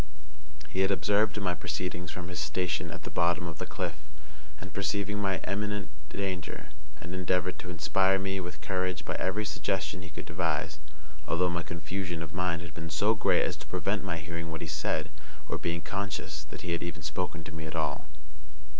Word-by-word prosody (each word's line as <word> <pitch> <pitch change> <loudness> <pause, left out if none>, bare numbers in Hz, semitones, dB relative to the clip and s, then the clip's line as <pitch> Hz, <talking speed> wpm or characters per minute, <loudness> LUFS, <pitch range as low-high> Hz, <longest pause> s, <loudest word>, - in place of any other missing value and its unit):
He 95 - -2
had 95 0 +5
observed 105 +2 +4
my 90 -3 +2
proceedings 90 0 -2
from 90 0 -4
his 90 -2 -3
station 85 +4 +1
at - - -6
the - - -5
bottom 85 0 +3
of 85 -1 -5
the - - -2
cliff; 85 -4 -2 0.6
and 95 - -7
perceiving 100 +1 +1
my 95 -2 +3
imminent 105 +1 0 0.2
danger, 95 -4 -2 0.3
had 85 +3 -7
endeavored 90 0 +2
to 95 - -5
inspire 90 +3 +4
me 95 0 0
with 85 -4 -5
courage 90 +2 0
by - - 0
every 105 +3 +1
suggestion 95 -2 0
he 90 - -7
could 75 - -6
devise; 75 - 0 0.5
although 90 +1 +3
my 85 0 +1
confusion 85 0 -2
of - - -7
mind 85 -1 +1
had 85 -3 -7
been 85 +1 -5
so 100 +8 +4
great 110 - +5
as - - +1
to - - -10
prevent - - +1
my 90 -4 0
hearing 85 0 -3
what 80 0 -4
he 85 - -2
said, 75 +2 0 0.4
or - - -1
being 85 0 0
conscious 100 -7 -2
that - - -8
he 90 - -2
had 85 - +1
even 85 -2 -3
spoken 85 +1 -1
to 80 - -7
me 80 0 -4
at 80 - -4
all. 80 -2 0
90 Hz, 195 wpm, -31 LUFS, 85-95 Hz, 0.6 s, had